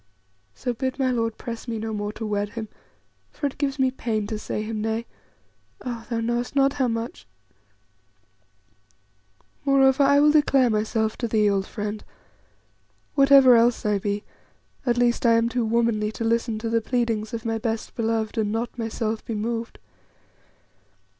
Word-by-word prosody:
So 245 - -2
bid 260 +2 -3
my 260 -2 +1
lord 230 -2 -1
press 235 +1 -7
me 230 -1 -3
no 220 0 -4
more 205 0 -3
to 220 - -6
wed 205 -1 -2
him, 220 -2 -5 0.6
for - - -5
it 280 - -3
gives 275 -1 -1
me 260 -1 +2
pain 220 -5 -2
to 210 +1 -4
say 215 - -3
him 215 0 -4
nay 225 +1 -2 0.8
ah! 235 -2 -5
thou 230 -1 -1
knowest 240 +3 -2
not 275 0 +4
how 265 -3 +1
much. 230 - -4 2.4
"Moreover, 270 -1 +4
I 280 +1 +5
will 300 +1 +6
declare 275 -5 +4
myself 220 +1 0
to 235 - -2
thee, 215 -1 +2
old 195 -1 +1
friend; 210 -1 -5 1.1
whatever 275 -3 +7
else 235 0 +3
I 210 -1 +2
be, 205 +1 -2 0.6
at 240 0 +2
least 240 -1 +2
I 235 -2 +5
am 230 0 +3
too 240 0 -1
womanly 225 -2 +1
to 230 - -4
listen 230 0 0
to 225 +1 -3
the 230 0 +2
pleadings 225 -3 -1
of 230 -1 -5
my 225 0 -1
best 225 -1 -3
beloved 225 -1 -1
and 210 -1 0
not 235 +2 -3
myself 225 -1 -2
be 225 - -4
moved. 230 +2 -3
230 Hz, 165 wpm, -24 LUFS, 220-245 Hz, 2.4 s, whatever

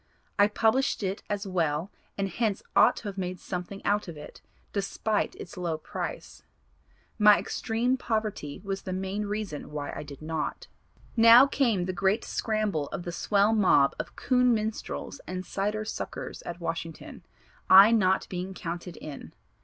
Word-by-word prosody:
I 205 - +7
published 225 +3 +1
it 190 +1 -2
as 205 0 -2
well 170 -2 -1 0.3
and 200 0 0
hence 205 +1 -1
ought - - +6
to - - -9
have 200 -1 -5
made 180 -1 -3
something 180 +2 -6
out 205 0 +1
of 165 -3 -8
it 150 - -11 0.3
despite 205 +1 -1
its 175 - -10
low 170 -3 -2
price. 155 - -6 0.8
My 210 -1 +8
extreme 240 +3 -1
poverty 215 - -3
was 195 -1 -3
the 185 - -5
main 190 +2 -3
reason 205 -7 -4
why 145 -1 -5
I - - -5
did 145 0 -10
not." 160 -1 -3 0.5
"Now 230 +3 +9
came 235 -10 +1
the 185 - -2
great 195 +4 +1
scramble 215 -9 -1
of 175 - -5
the 175 - -4
swell 200 +4 +2
mob 185 -10 +4
of - - -5
coon 250 -2 +3
minstrels 215 0 -4
and 185 0 -4
cider 210 +3 -2
suckers - - -6
at 175 0 -5
Washington, 165 -1 -6 0.5
I 195 +4 +10
not 190 -4 +3
being 185 +1 -5
counted 170 0 -6
in. 145 -3 -9
195 Hz, 160 wpm, -28 LUFS, 175-215 Hz, 0.8 s, I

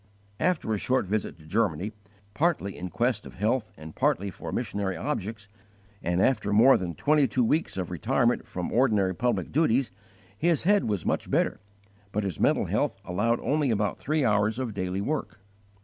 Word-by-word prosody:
After 175 -11 +1
a 105 - -1
short 130 +1 +1
visit 100 -1 -2
to 80 - -17
Germany, 100 +1 0 0.4
partly 145 - 0
in 90 +1 -6
quest 115 +4 -1
of - - -12
health 110 +4 0
and 80 0 -10
partly 130 -8 +1
for - - -7
missionary 100 -5 -2
objects, 110 - -4 0.5
and 90 +1 0
after 125 -6 +1
more 115 +6 +7
than 85 -3 -3
twenty 150 - +3
two 125 +2 +1
weeks 150 - 0
of 90 -1 -3
retirement 120 +6 +1
from 90 -4 -4
ordinary 105 -7 +3
public 115 -4 -1
duties, 135 -4 +2 0.4
his 165 +7 +1
head 205 +3 +3
was 100 -6 -2
much - - -1
better, - - +1 0.5
but 105 +1 -1
his 95 -5 -4
mental - - +3
health - - -1
allowed 105 +6 +1
only 145 -1 +1
about 105 -3 0
three 150 -1 0
hours 105 0 +2
of 125 -4 -3
daily 95 0 -2
work. 145 +4 -3
110 Hz, 175 wpm, -27 LUFS, 95-130 Hz, 0.5 s, more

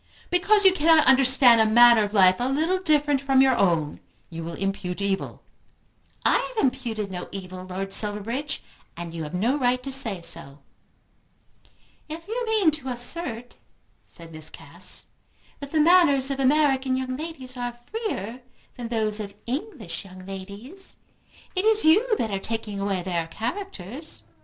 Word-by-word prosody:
"Because 400 +3 +3
you 380 - +7
cannot 320 -3 +4
understand 260 -3 +6
a - - +4
manner 235 +1 +7
of 205 -1 -1
life 185 -3 +5
a 245 +2 -1
little 320 +7 0
different 295 -5 +2
from 270 -1 +2
your 265 -1 +5
own 165 -8 0 0.3
you 165 0 -6
will 165 0 -6
impute 195 -2 -3
evil." 200 -1 -3 0.8
"I - - +4
have 475 -3 -3
imputed 235 -6 -3
no 180 -1 -6
evil, 185 -1 -8
Lord 195 +1 -5
Silverbridge, 225 +8 0 0.3
and 170 -1 -7
you 165 - -5
have 155 +2 -6
no 240 +10 0
right 250 -1 +1
to 275 - -5
say 235 -8 +1
so." 165 -4 -4 1.5
"If 330 +3 -8
you 475 +3 -3
mean 425 -7 +3
to 295 -3 -5
assert," 245 -1 -5 0.5
said 165 -1 -14
Miss 155 -1 -6
Cass, - - -5 0.5
"that 280 -1 -8
the 315 - +1
manners 300 -5 +5
of 275 - -3
American 270 -1 +2
young 255 0 -3
ladies 275 -4 -7
are 245 -1 -3
freer 245 - -6 0.3
than 240 -2 -7
those 220 -2 -1
of 200 -1 -7
English 240 - -5
young 185 -1 -13
ladies, 200 - -9 0.6
it 370 - 0
is 440 -2 +3
you 430 +8 +4
that 220 - -2
are 195 - -2
taking 215 -1 -4
away 195 -2 -2
their 170 -2 -2
characters." 255 - -6
245 Hz, 160 wpm, -24 LUFS, 195-295 Hz, 1.5 s, you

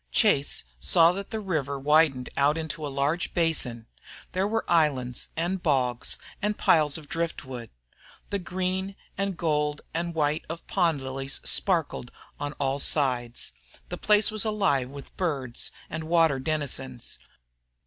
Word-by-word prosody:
Chase 175 -11 +2 0.2
saw 165 - +5
that 195 +2 -5
the 220 - -3
river 155 -9 -1
widened 145 -2 +3
out 145 +3 +3
into 160 -1 -4
a 145 - -2
large 140 +5 -1
basin. 145 -9 0 0.5
There 190 +2 +1
were 225 +1 -1
islands, 140 -7 +2
and 175 +3 -1
bogs, 130 -7 +1 0.2
and 210 +1 0
piles 150 -2 +4
of 155 -2 -11
driftwood. 130 -7 -4 0.6
The 200 - 0
green 185 +2 -2 0.2
and 195 -2 -1
gold 150 -3 0
and 170 0 -2
white 150 -1 +1
of 165 +1 -6
pond 165 -7 +1
lilies 135 +1 -3
sparkled 165 -9 +1 0.3
on 145 0 -3
all 140 -1 -1
sides. 125 -5 0 0.4
The - - -4
place 210 0 +4
was 215 -2 +1
alive 195 - +1
with 140 0 -10
birds 140 -9 -1 0.2
and 160 - -5
water 165 -4 +4
denizens. 130 -4 -3
155 Hz, 140 wpm, -27 LUFS, 135-175 Hz, 0.6 s, saw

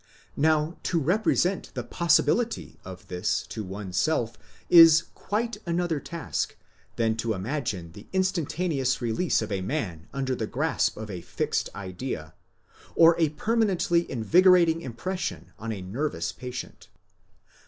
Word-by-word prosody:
Now 155 +2 +1
to 170 - 0
represent 185 +3 +1
the - - -3
possibility 175 +7 +1
of 95 0 -10
this 90 +3 -1
to 110 - -5
one's 95 -1 -6
self 120 -8 +1 0.3
is 165 -2 +8
quite 220 +2 -2
another 170 -2 0
task 170 +1 -4 0.4
than 115 -1 +1
to 115 0 -1
imagine 100 - -3
the 100 +5 -13
instantaneous 170 -7 0
release 120 +4 0
of 110 - -6
a 95 -1 -1
man 95 - -3
under 135 -1 -2
the 110 - -3
grasp - - 0
of 110 -1 -6
a 90 -2 -6
fixed - - -2
idea, 95 - -5 0.6
or 165 0 +7
a 160 -2 +3
per 215 +10 -2
manently 180 -6 +2
invigorating 170 - +4
impression 180 +9 -4
on 115 +1 -4
a 100 -4 -5
nervous 95 - -2
patient. 125 0 -8
140 Hz, 135 wpm, -26 LUFS, 110-170 Hz, 0.6 s, is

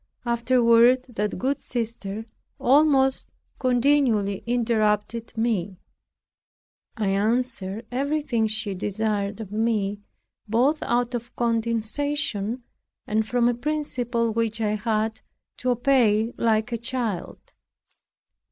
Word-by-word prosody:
Afterward 235 +1 +4
that 210 -4 -2
good 265 +8 -1
sister 220 -3 -4 0.3
almost 270 -1 +3 0.3
continually 245 -6 +2
interrupted 230 -1 0
me; 205 -5 -1 1.2
I 210 -3 0
answered 220 0 0
everything 270 -3 0
she 215 -1 -2
desired 205 +1 -2
of 210 -3 -7
me, 210 -2 0 0.5
both 255 +8 +2
out 240 +1 0
of 240 +1 -5
condescension, 230 0 -1 0.4
and 215 +1 0
from 245 0 +2
a 245 - +3
principle 240 -4 -1
which 225 0 -1
I 210 -1 0
had 220 0 -1 0.4
to 255 - -2
obey 240 -3 +3
like 220 0 +1
a 235 - -1
child. 235 -5 -4
230 Hz, 100 wpm, -24 LUFS, 215-245 Hz, 1.2 s, Afterward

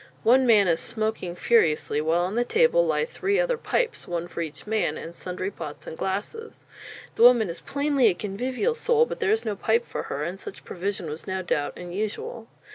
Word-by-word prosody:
One 255 +3 +5
man 210 -4 +6
is 165 -2 +2
smoking 215 -5 -2
furiously, 160 -9 +2
while 160 +3 +2
on 185 +3 -2
the 240 +2 +2
table 485 - +3
lie - - +1
three 405 -3 -1
other - - +2
pipes 480 +1 -1
one 175 -1 -3
for 170 - -5
each 155 -2 -6
man 210 -8 0
and 165 - -8
sundry 185 +2 -4
pots 150 -4 -8
and - - -7
glasses. 210 - -4 0.5
The - - -4
woman 235 -6 +6
is 165 0 -10
plainly 280 - +2
a 190 - +3
convivial 250 - -1
soul; 470 0 +3
but - - -6
there 430 - +1
is 440 +1 +1
no 215 - -1
pipe 225 +4 +1
for - - -4
her, 140 +2 -3
and 180 +5 -4
such - - -8
provision 190 -1 -4
was 155 +1 -7
no 190 0 -2
doubt 145 -4 -1
unusual. 210 +5 -5
210 Hz, 200 wpm, -25 LUFS, 175-260 Hz, 0.5 s, man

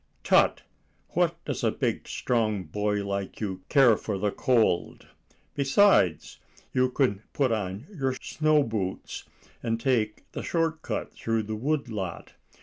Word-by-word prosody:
"Tut! - - +4 0.5
what - - 0
does - - -3
a - - +4
big - - -2
strong 110 -5 0
boy 105 +1 -1
like 100 -1 -4
you 95 -4 -3
care 135 -6 +6
for 105 -1 -3
the 100 +1 0
cold? 115 -10 +1 0.5
Besides, 140 - +3 0.3
you 130 0 +3
can 125 -6 +1
put 135 -4 +1
on 100 +1 -2
your 135 -6 -1
snow 155 0 +1
shoes, 100 -4 -4 0.4
and 115 -1 -1
take 115 -4 0
the - - -5
short 165 -2 -1
cut - - -4
through 115 -1 -1
the 110 +1 -4
wood 140 +5 -1
lot. 95 -7 -5
115 Hz, 145 wpm, -27 LUFS, 100-135 Hz, 0.5 s, care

